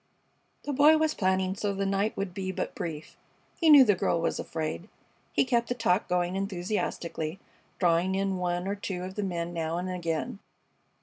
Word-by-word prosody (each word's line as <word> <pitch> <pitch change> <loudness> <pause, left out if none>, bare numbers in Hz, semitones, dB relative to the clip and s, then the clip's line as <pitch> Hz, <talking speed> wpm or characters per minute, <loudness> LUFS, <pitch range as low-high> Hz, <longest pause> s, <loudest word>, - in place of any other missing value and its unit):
The 290 - -3
Boy 295 +3 +6
was 315 0 +1
planning 185 -1 +1
so 200 0 -2
the 195 0 -1
night 195 +2 0
would 195 -2 -3
be 190 -1 -3
but - - -3
brief. 155 -2 -6 0.4
He 330 - +4
knew 290 -3 +10
the 210 -5 +4
girl 170 -2 0
was 165 - -1
afraid. 160 +4 -4 0.4
He - - +2
kept 235 -2 +1
the 245 - 0
talk 185 -4 +1
going 180 0 0
enthusiastically, 185 -3 -3 0.4
drawing 175 +1 +2
in 195 -1 0
one 175 0 -1
or 200 - 0
two 190 -3 -4
of 185 +1 -6
the 210 - -3
men 175 -3 -3
now 165 0 -2
and 180 +1 -3
again. 170 +1 -3
190 Hz, 185 wpm, -28 LUFS, 175-205 Hz, 0.4 s, knew